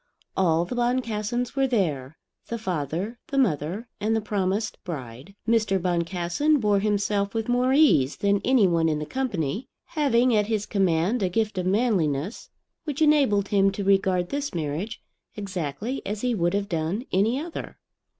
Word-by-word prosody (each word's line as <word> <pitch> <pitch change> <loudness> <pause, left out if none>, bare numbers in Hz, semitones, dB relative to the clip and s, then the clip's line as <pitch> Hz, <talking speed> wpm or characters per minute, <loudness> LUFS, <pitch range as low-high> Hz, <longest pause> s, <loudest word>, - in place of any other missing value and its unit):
All 170 -2 +2
the 175 - -6
Boncassens 240 -1 -1
were 270 -1 +2
there, 155 - -1 0.3
the 235 - -3
father, 185 - -3
the 275 - -3
mother, 195 - 0
and 220 +2 +1
the - - +2
promised 205 0 -2
bride. 135 +1 -7
Mr. 215 -4 +2
Boncassen 180 - +1
bore 210 -3 +2
himself 205 0 0
with 225 -1 -1
more 250 +1 +2
ease 265 - +4
than 200 0 +1
any 250 -6 +4
one 165 -2 +2
in 155 - 0
the 150 - -4
company, 210 - -2 0.2
having 255 -6 +2
at 210 -1 +2
his 215 -2 -1
command 190 +3 +1
a 185 - +1
gift 215 0 -1
of 180 - -1
manliness 185 - 0 0.3
which 295 -4 -4
enabled 270 -10 +3
him 195 -1 +4
to 200 - -3
regard 190 -2 +2
this 285 -6 -3
marriage 165 +8 -3 0.3
exactly 200 - -4
as 205 +1 -4
he 250 -1 +1
would 175 -3 +1
have 200 0 -1
done 170 +8 -2
any 220 +8 +2
other. 330 +2 -7
200 Hz, 160 wpm, -25 LUFS, 175-235 Hz, 0.3 s, ease